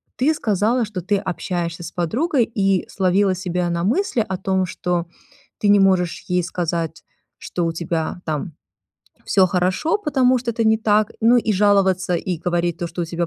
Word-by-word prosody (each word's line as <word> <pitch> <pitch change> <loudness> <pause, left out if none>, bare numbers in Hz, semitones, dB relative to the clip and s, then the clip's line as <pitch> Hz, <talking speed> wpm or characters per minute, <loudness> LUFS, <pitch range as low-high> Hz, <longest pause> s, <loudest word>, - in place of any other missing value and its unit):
Ты 285 +5 +2
сказала, 225 - +1
что 205 -4 -6
ты 200 +4 0
общаешься 175 -2 -3
с 165 - -7
подругой 240 - 0
и 195 -5 0
словила 190 0 +1
себя 180 -1 -2
на 170 0 -1
мысли 240 - +1
о 190 -2 -3
том, 190 0 0
что 175 -1 -2 0.5
ты 210 - -1
не 205 -1 +6
можешь 185 -3 +2
ей 180 0 +2
сказать, 170 -2 -3 0.3
что 175 - -3
у 165 - -1
тебя 165 0 -3
там 155 +2 -3 0.7
всё 190 -2 +4
хорошо, 185 - +1
потому 265 -9 +2
что 240 0 -3
это 230 0 -1
не 220 0 +4
так, 215 -1 +1
ну, 235 +2 +6
и 225 -2 0
жаловаться 190 -2 +2
и 180 +1 -3
говорить 175 0 -1
то, 175 - -3
что 175 - -6
у 170 - -3
тебя 170 +1 -2
185 Hz, 180 wpm, -21 LUFS, 175-215 Hz, 0.7 s, не